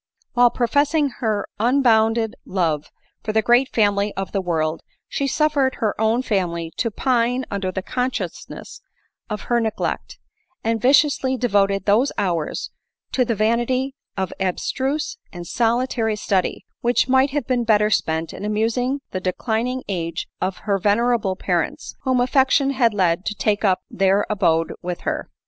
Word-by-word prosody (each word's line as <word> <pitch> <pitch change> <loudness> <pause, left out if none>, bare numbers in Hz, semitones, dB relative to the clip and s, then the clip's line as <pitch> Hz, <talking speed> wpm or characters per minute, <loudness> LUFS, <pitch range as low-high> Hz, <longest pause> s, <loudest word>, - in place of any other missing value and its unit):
While 245 -1 +5
professing 285 +5 +1
her 215 -3 0
unbounded 225 -2 +3
love 165 -6 -1 0.3
for 215 - -2
the 220 0 +2
great 245 +3 +4
family 205 -1 +1
of 195 0 -4
the 195 - 0
world, 160 -3 -1 0.3
she 280 - -2
suffered 285 -2 +1
her 215 -2 0
own 225 +3 +2
family 170 -7 -1
to 230 - 0
pine 245 +2 0
under 195 -2 -2
the 190 0 -4
consciousness 255 +3 -4 0.5
of 210 -1 -3
her 240 -1 +1
neglect; 220 -1 -3 0.5
and 225 -1 0
viciously 265 0 +3
devoted 200 -5 +1
those 225 +7 +3
hours 175 -6 -2 0.4
to 255 - +2
the 230 -2 -1
vanity 240 +5 +1 0.2
of 190 -2 -2
abstruse 265 - -2
and 175 -2 -8
solitary 230 +1 0
study, 195 -3 -1
which 240 +1 +2
might 265 +1 +4
have 280 -2 -2
been 250 -1 0
better 210 -2 +3
spent 160 -4 0
in - - -8
amusing 230 +6 0
the 185 - -3
declining 230 +7 -1
age 170 -4 -3
onher 195 +1 -1
ven 205 +1 +3
erable 235 -6 +1
parents, 175 -4 -2
whom 260 -1 +2
affection 265 +2 +3
had 240 -5 +2
led 180 -2 +2
to 210 - -3
take 210 0 0
up 190 -3 +2
their 195 +1 +2
abode 165 -5 +1
with. 175 0 -4
her. - - -3
220 Hz, 150 wpm, -22 LUFS, 195-250 Hz, 0.5 s, While